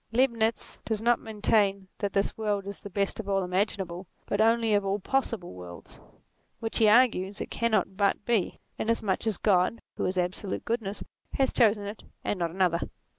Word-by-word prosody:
Leibnitz 230 Hz, -2 st, +1 dB
does 220 Hz, -2 st, -1 dB
not 235 Hz, +2 st, +3 dB
maintain 205 Hz, -3 st, +1 dB
that 200 Hz, -2 st, -2 dB
this 200 Hz, -, +1 dB
world 205 Hz, -3 st, -1 dB
is 200 Hz, 0 st, -6 dB
the 205 Hz, -, -9 dB
best 200 Hz, +2 st, -1 dB
of 205 Hz, -2 st, -5 dB
all 195 Hz, -1 st, +2 dB
imaginable, 185 Hz, -1 st, -2 dB, 0.2 s
but 205 Hz, -, 0 dB
only 225 Hz, 0 st, +3 dB
of 205 Hz, -1 st, +3 dB
all 195 Hz, +1 st, 0 dB
possible 230 Hz, -, -1 dB
worlds; 90 Hz, -1 st, -11 dB, 0.6 s
which, 225 Hz, -1 st, -2 dB
he 220 Hz, -, +6 dB
argues, 210 Hz, -4 st, +3 dB
it -, -, -5 dB
cannot 215 Hz, -5 st, 0 dB
but 200 Hz, -1 st, +1 dB
be, 230 Hz, -6 st, 0 dB, 0.2 s
inasmuch 220 Hz, -2 st, 0 dB
as 215 Hz, -5 st, 0 dB
God, 195 Hz, +2 st, +2 dB, 0.2 s
who -, -, -1 dB
is 185 Hz, 0 st, -2 dB
absolute 180 Hz, +2 st, -2 dB
goodness, 220 Hz, -3 st, -2 dB, 0.3 s
has 270 Hz, -2 st, +1 dB
chosen 215 Hz, -3 st, +4 dB
it 205 Hz, +2 st, -6 dB, 0.2 s
and 205 Hz, -, -1 dB
not 170 Hz, -1 st, 0 dB
another. 175 Hz, -1 st, +1 dB
205 Hz, 175 wpm, -28 LUFS, 190-225 Hz, 0.6 s, he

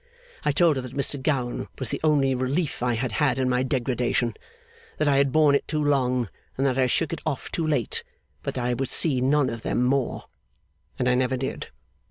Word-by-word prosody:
I 150 Hz, -, +2 dB
told 160 Hz, 0 st, +3 dB
her -, -, -1 dB
that 125 Hz, +1 st, -9 dB
Mr 140 Hz, 0 st, +1 dB
Gowan 130 Hz, -4 st, -1 dB
was 130 Hz, -4 st, -5 dB
the -, -, -3 dB
only 145 Hz, -4 st, +3 dB
relief 135 Hz, +5 st, -1 dB
I 120 Hz, -1 st, +1 dB
had 120 Hz, +1 st, -2 dB
had 135 Hz, -1 st, +1 dB
in 130 Hz, -1 st, +1 dB
my 125 Hz, 0 st, +2 dB
degradation; 125 Hz, -2 st, 0 dB, 0.6 s
that 155 Hz, -, +1 dB
I 140 Hz, -1 st, +4 dB
had 140 Hz, -1 st, +3 dB
borne 155 Hz, -1 st, +4 dB
it 140 Hz, -, +1 dB
too 155 Hz, -, -1 dB
long, 130 Hz, -4 st, +1 dB, 0.3 s
and 135 Hz, -, +1 dB
that 135 Hz, -1 st, +1 dB
I 130 Hz, -, +4 dB
shook 160 Hz, +6 st, 0 dB
it -, -, -5 dB
off 155 Hz, -4 st, -3 dB
too 165 Hz, -2 st, -1 dB
late; 140 Hz, -7 st, 0 dB, 0.4 s
but -, -, -4 dB
that 125 Hz, -, -2 dB
I 125 Hz, -, +1 dB
would 130 Hz, +1 st, -2 dB
see 135 Hz, -6 st, +3 dB
none 135 Hz, 0 st, +2 dB
of 115 Hz, -1 st, -6 dB
them 125 Hz, -, 0 dB
more. 130 Hz, 0 st, 0 dB, 0.7 s
And 125 Hz, -, 0 dB
I 125 Hz, -, +4 dB
never 130 Hz, +1 st, +1 dB
did. 130 Hz, +1 st, -4 dB
130 Hz, 220 wpm, -25 LUFS, 125-145 Hz, 0.7 s, I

